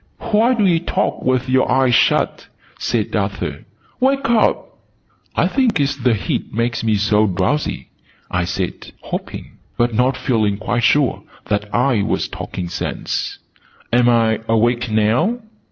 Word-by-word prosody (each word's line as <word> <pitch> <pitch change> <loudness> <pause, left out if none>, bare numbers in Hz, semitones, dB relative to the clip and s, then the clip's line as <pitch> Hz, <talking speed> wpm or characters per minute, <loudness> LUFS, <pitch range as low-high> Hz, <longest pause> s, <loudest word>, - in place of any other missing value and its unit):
"Why 230 +4 +4
do 215 -3 +2
you 170 -3 +3
talk 170 - -1
with 130 0 0
your 130 0 +2
eyes 130 -1 +3
shut?" - - +2 0.3
said - - -1
Arthur. - - -3 0.3
"Wake 275 +1 +2
up!" 225 -2 +1 0.6
"I - - +3
think 255 - +1
it's 140 0 +1
the 125 -4 +1
heat 100 - -3
makes 115 +1 -1
me 110 -1 +2
so 105 +1 +2
drowsy," 95 +11 -1 0.4
I 90 -1 0
said, 95 0 -4
hoping, - - -7 0.2
but 120 0 +1
not 125 +3 +2
feeling 110 -5 0
quite 120 +3 -1
sure, 145 -4 +2 0.3
that 105 0 -1
I 120 -2 +2
was - - -1
talking 90 -2 -6
sense. 85 - -3 0.6
"Am 120 0 +4
I 115 -2 +3
awake 120 +2 +2
now?" 110 - +2
120 Hz, 145 wpm, -19 LUFS, 110-140 Hz, 0.6 s, Why